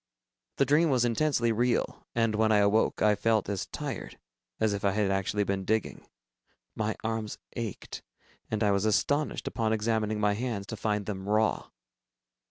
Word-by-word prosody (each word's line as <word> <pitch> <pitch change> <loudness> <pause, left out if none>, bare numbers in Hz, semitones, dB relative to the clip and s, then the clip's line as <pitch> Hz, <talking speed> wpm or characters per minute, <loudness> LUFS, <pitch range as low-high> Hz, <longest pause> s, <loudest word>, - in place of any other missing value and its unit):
The 140 - +3
dream 155 +4 +4
was 125 -3 +3
intensely 120 -1 +1
real, 120 +2 0
and 115 -2 +2
when 110 +1 +2
I 105 - +5
awoke, 105 +2 +2
I 105 -1 +5
felt 110 0 +1
as 100 -2 -3
tired - - -6 0.4
as 110 -2 +2
if 100 +1 -4
I 100 -1 +2
had 100 -1 +1
actually 95 +2 0
been 100 -1 -2
digging. 110 +3 -2 0.7
My 110 0 -1
arms 110 -1 -3 0.2
ached, 115 -4 -5 0.5
and 110 0 -1
I 105 - +3
was 100 +1 +1
astonished, 145 +7 +1
upon 110 -2 0
examining 110 -1 0
my 105 -1 +2
hands, 110 -2 -3
to 110 - -4
find 105 -1 -1
them 100 -1 -5
raw. 110 +1 +1
110 Hz, 170 wpm, -29 LUFS, 105-115 Hz, 0.7 s, I